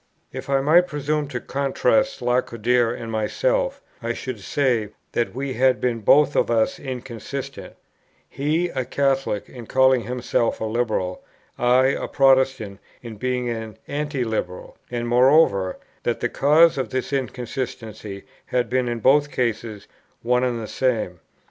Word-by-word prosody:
If 130 Hz, +1 st, -7 dB
I 135 Hz, -1 st, +2 dB
might 170 Hz, +6 st, +5 dB
presume 150 Hz, 0 st, -2 dB
to 130 Hz, -3 st, -4 dB
contrast 140 Hz, -, 0 dB
Lacordaire 120 Hz, -1 st, +1 dB
and 115 Hz, -1 st, -6 dB
myself, -, -, 0 dB, 0.2 s
I -, -, -2 dB
should 130 Hz, -5 st, -6 dB
say, 120 Hz, -1 st, 0 dB, 0.2 s
that 120 Hz, -1 st, -1 dB
we 135 Hz, 0 st, -3 dB
had 130 Hz, 0 st, +3 dB
been 120 Hz, -2 st, 0 dB
both 145 Hz, +6 st, +4 dB
of -, -, +2 dB
us 115 Hz, -2 st, +1 dB
inconsistent; 130 Hz, +1 st, -7 dB, 0.5 s
he, 155 Hz, +5 st, -1 dB
a 130 Hz, -5 st, -2 dB
Catholic, 135 Hz, -4 st, 0 dB
in 120 Hz, -3 st, -11 dB
calling 130 Hz, -1 st, +4 dB
himself 120 Hz, -1 st, -1 dB
a -, -, -3 dB
Liberal; 110 Hz, -5 st, -1 dB, 0.4 s
I, 125 Hz, +2 st, +4 dB
a -, -, -2 dB
Protestant, 130 Hz, -7 st, +2 dB, 0.2 s
in 115 Hz, -3 st, -8 dB
being 125 Hz, +2 st, -1 dB
an 110 Hz, -2 st, -5 dB
Anti 145 Hz, -2 st, -2 dB
liberal; 110 Hz, -6 st, -4 dB
and 120 Hz, -1 st, -3 dB
moreover, 120 Hz, -, +4 dB, 0.2 s
that -, -, -1 dB
the -, -, -1 dB
cause 155 Hz, +2 st, +4 dB
of 130 Hz, -4 st, -2 dB
this 130 Hz, +3 st, -3 dB
inconsistency 120 Hz, -5 st, -4 dB, 0.2 s
had 125 Hz, -2 st, -1 dB
been 130 Hz, -1 st, +1 dB
in 120 Hz, -1 st, -3 dB
both 145 Hz, +4 st, +4 dB
cases 115 Hz, -5 st, -3 dB, 0.4 s
one 125 Hz, +1 st, +2 dB
and 125 Hz, -2 st, 0 dB
the 110 Hz, -, -5 dB
same. 110 Hz, -10 st, -1 dB
125 Hz, 150 wpm, -23 LUFS, 115-135 Hz, 0.5 s, might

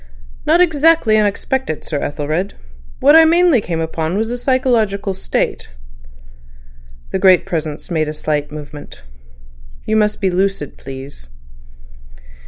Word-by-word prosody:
"Not 330 Hz, +3 st, +4 dB
exactly 320 Hz, -8 st, +3 dB
unexpected, 215 Hz, -, -1 dB
Sir 150 Hz, -, -3 dB
Ethelred. 155 Hz, +7 st, -3 dB, 0.5 s
What 290 Hz, +3 st, +6 dB
I 325 Hz, -, +9 dB
mainly 335 Hz, -5 st, +4 dB
came 170 Hz, -4 st, -4 dB
upon 160 Hz, +2 st, -2 dB
was 225 Hz, +2 st, -1 dB
a 245 Hz, -, -2 dB
psychological 230 Hz, -7 st, 0 dB
state." 190 Hz, -, -3 dB, 1.4 s
The -, -, -1 dB
Great 185 Hz, -2 st, +5 dB
Presence 155 Hz, 0 st, -4 dB
made 155 Hz, -2 st, 0 dB
a -, -, -2 dB
slight 150 Hz, -1 st, -2 dB
movement. 145 Hz, -, -10 dB, 0.8 s
"You 215 Hz, -, 0 dB
must 210 Hz, -1 st, +1 dB
be 190 Hz, -2 st, 0 dB
lucid, 190 Hz, -5 st, -1 dB
please." 135 Hz, -, -10 dB
195 Hz, 125 wpm, -17 LUFS, 155-245 Hz, 1.4 s, I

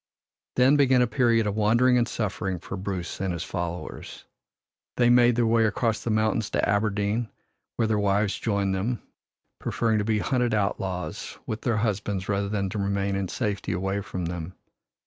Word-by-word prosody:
Then 130 Hz, +3 st, +5 dB
began 130 Hz, -3 st, +5 dB
a -, -, +4 dB
period 115 Hz, -2 st, +2 dB
of 105 Hz, -1 st, -1 dB
wandering 120 Hz, +4 st, +4 dB
and 120 Hz, -1 st, +3 dB
suffering 100 Hz, -4 st, -2 dB
for 90 Hz, +2 st, -7 dB
Bruce 95 Hz, -3 st, -4 dB
and 95 Hz, -1 st, 0 dB
his 85 Hz, -1 st, -3 dB
followers. 85 Hz, 0 st, -6 dB, 0.7 s
They 120 Hz, -1 st, +5 dB
made 120 Hz, -1 st, +5 dB
their 120 Hz, 0 st, +2 dB
way 115 Hz, 0 st, +3 dB
across 110 Hz, +1 st, 0 dB
the -, -, -2 dB
mountains 110 Hz, 0 st, +1 dB
to -, -, 0 dB
Aberdeen, 105 Hz, +2 st, 0 dB, 0.5 s
where 115 Hz, -, +1 dB
their 110 Hz, -1 st, +1 dB
wives 100 Hz, 0 st, +1 dB
joined 100 Hz, -3 st, 0 dB
them, 105 Hz, +6 st, -2 dB, 0.6 s
preferring 110 Hz, -2 st, 0 dB
to -, -, 0 dB
be 110 Hz, 0 st, +1 dB
hunted 120 Hz, +1 st, +1 dB
outlaws 95 Hz, -3 st, -3 dB
with 110 Hz, -, -4 dB
their 115 Hz, -3 st, 0 dB
husbands 105 Hz, -3 st, -1 dB
rather 100 Hz, 0 st, 0 dB
than 100 Hz, -2 st, -1 dB
to 105 Hz, -, -4 dB
remain 100 Hz, 0 st, 0 dB
in 95 Hz, -1 st, -1 dB
safety 105 Hz, +2 st, -2 dB
away 95 Hz, +3 st, -1 dB
from 90 Hz, -2 st, -5 dB
them. 85 Hz, +1 st, -5 dB
105 Hz, 175 wpm, -26 LUFS, 95-115 Hz, 0.7 s, Then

